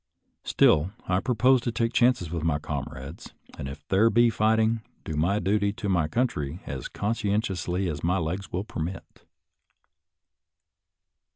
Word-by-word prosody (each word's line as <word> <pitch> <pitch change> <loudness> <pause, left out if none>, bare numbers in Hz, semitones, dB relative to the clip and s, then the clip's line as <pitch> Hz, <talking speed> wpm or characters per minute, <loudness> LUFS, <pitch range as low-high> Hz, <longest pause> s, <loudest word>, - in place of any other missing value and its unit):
Still, 75 +6 +3 0.2
I 90 0 +2
propose 125 +3 +3
to 120 - -2
take 115 0 -1
chances 120 -9 +2
with 85 -2 -3
my 80 -3 +1
com 75 -2 -4
rades, 70 +6 -10 0.2
and, - - -6
if 75 +2 -9
there 105 +4 +4
be 120 +1 +4
fighting, 110 +1 +2 0.2
do 80 - -4
my 90 +7 +1
duty 100 +1 +1
to 105 -1 -4
my 85 -5 +2
country 80 - -1
as 65 -2 -5
conscientiously 100 -4 -1
as 75 -4 -4
my 90 +3 +2
legs 90 +3 -3
will 90 +2 -2
per 95 - -6
mit. 90 +4 -7
95 Hz, 155 wpm, -26 LUFS, 80-110 Hz, 0.2 s, there